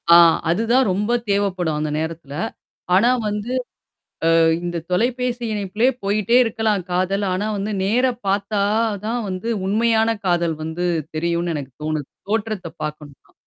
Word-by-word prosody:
ஆ, 170 - +9 0.3
அது 175 +6 +2
தான் 260 0 +4
ரொம்ப 205 +5 0 0.2
தேவைப்படும் 185 -6 0
அந்த 155 0 -1
நேரத்துல. 160 -3 -5 0.6
ஆனா 220 +7 +5 0.2
வந்து 210 +2 -3 0.8
அ - - +5 0.3
இந்தத் 170 -1 -4
தொலைபேசி 245 +4 0
இணைப்பிலே 210 +3 0 0.2
போயிட்டே 210 +4 +2
இருக்கலாம் 215 -4 0
காதல். 185 +3 0
ஆனா 200 +3 -1
வந்து 200 +2 -2
நேரா 245 +6 +2 0.2
பார்த்தா 200 +1 0 0.4
தான் 235 +2 -1
வந்து 185 +5 -3 0.2
உண்மையான 225 +2 +3 0.2
காதல் 170 -2 +1
வந்து 160 +3 -3 0.3
தெரியுன்னு 170 +1 0
எனக்குத் 135 -3 -7
தோணுது. 155 -2 -2 0.2
தோற்றத்தப் 205 -6 -3
பார்க்கணுன்னா! 150 -2 -8
195 Hz, 135 wpm, -21 LUFS, 170-220 Hz, 0.8 s, ஆ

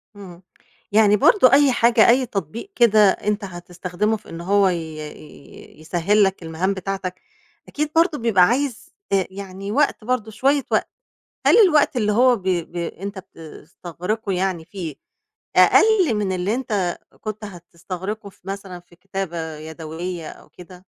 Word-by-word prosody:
امم، 185 -3 -12 0.5
يعني 210 0 +5
برضه 255 - +5
أي 285 -1 +6
حاجة، 235 -2 +4
أي 255 +2 +4
تطبيق 215 - -6
كده 215 -4 +5
أنت 210 +2 -2
هتستخدمه 180 +3 -3
في 215 - -18
إن 165 0 -7
هو 200 +2 +3
ي 180 - 0 0.2
ي 150 -1 -12
يسهّل 175 +6 +1
لك 190 -2 -1
المهام 165 +4 -1
بتاعتك، 190 -1 -5 0.5
أكيد 300 0 -3
برضه 330 -1 +3
بيبقى 225 -7 +3
عايز 245 +4 -1 0.2
ت 195 -2 +1
يعني 195 0 -7
وقت 280 -2 +1
برضه 225 -2 -2
شوية 275 +5 +1
وقت، - - +1 0.6
هل - - +6
الوقت 340 - +4
اللي 210 -3 +1
هو 245 +3 +4
ب 200 - -11
ب 175 -2 -2
أنت 190 +3 -5
بتستغرقه 180 +4 -7
يعني 180 -3 -1
فيه 170 -7 -7 0.6
أقل 400 - +5
من 200 -2 -1
اللي 185 +4 -1
أنت 205 -9 -2 0.2
كُنت 215 0 -6
هتستغرقه 185 +3 -7
في - - -25
مثلًا 195 -2 -6
في 175 0 -22
كتابة 175 -4 -5
يدويّة 160 +2 -7
أو - - -15
كده؟ 180 +1 -15
195 Hz, 150 wpm, -21 LUFS, 175-220 Hz, 0.6 s, أي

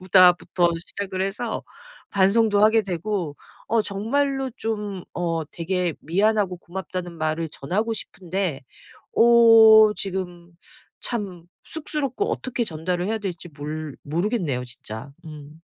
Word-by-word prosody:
보다.'부터 180 -1 +4
시작을 190 -2 -4
해서 210 +4 -3 0.5
반성도 205 +2 +4
하게 220 0 +5
되고 180 -4 -3 0.3
어 225 0 +3
정말로 270 +7 -1
좀 210 -4 -4
어 165 -2 -1
되게 175 +2 -2
미안하고 195 +2 +1
고맙다는 180 0 -6
말을 155 +1 -1
전하고 195 +11 -2
싶은데 185 -8 -4 0.5
어 225 -2 +8
지금 180 -3 -5 0.5
참 195 -8 -4 0.2
쑥스럽고 300 -5 -3
어떻게 250 -2 -2
전달을 175 +1 -2
해야 220 +2 -1
될지 180 -4 -6
몰 150 0 -6
모르겠네요 165 - -1
진짜. 125 +1 -9
음. 155 0 -11
185 Hz, 255 characters per minute, -24 LUFS, 165-220 Hz, 0.5 s, 어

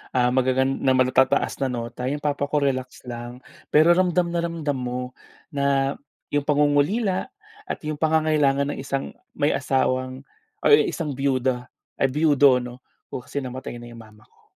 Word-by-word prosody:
ah, 125 0 +3
magagan 130 +1 +1
ng 130 -1 +3
matataas 130 +1 +2
na 135 - +1
nota, 120 0 -4
yung 145 +2 -3
papa 145 -1 0
ko 145 -1 0
relax 130 -2 -2
lang. 120 +1 -8 0.3
Pero 155 +3 +6
ramdam 175 -1 +2
na 170 - 0
ramdam 160 -5 -2
mo 125 0 -3 0.5
na 140 -1 +1 0.3
yung 145 0 0
pangungulila 150 - +2 0.4
at - - -3
yung 150 -1 -4
pangangailangan 150 -3 +2
ng - - -8
isang 135 0 -3 0.2
may 145 - +2
asawang 130 -1 -1 0.4
or - - +4
ang 435 -1 +6
isang 165 - -3
biyuda 130 -2 0 0.3
ay 135 - +4
biyudo 145 -2 +4
'no, 125 0 -8 0.4
oo, 125 - -3
kasi 140 +2 -5
namatay 130 0 -6
na 120 0 -10
yung 115 - -11
mama 105 -1 -17
ko. - - -31
135 Hz, 165 wpm, -24 LUFS, 130-150 Hz, 0.5 s, Pero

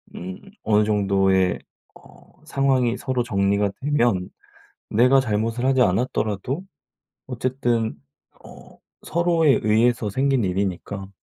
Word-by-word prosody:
음 90 +1 -7 0.2
어느 105 -1 +3
정도의 95 -3 +2 0.4
어 - - -20
상황이 135 -5 +1
서로 130 -2 -2
정리가 100 -1 0
되면 120 -10 +1 0.6
내가 125 +5 +4
잘못을 115 +1 -2
하지 130 -1 +2
않았더라도 110 - -1 0.6
어쨌든 120 -3 -1 0.5
어 - - -15 0.3
서로에 170 -4 +2
의해서 110 0 +2
생긴 130 0 +1
일이니까 95 +1 -3
115 Hz, 240 characters per minute, -22 LUFS, 100-130 Hz, 0.6 s, 내가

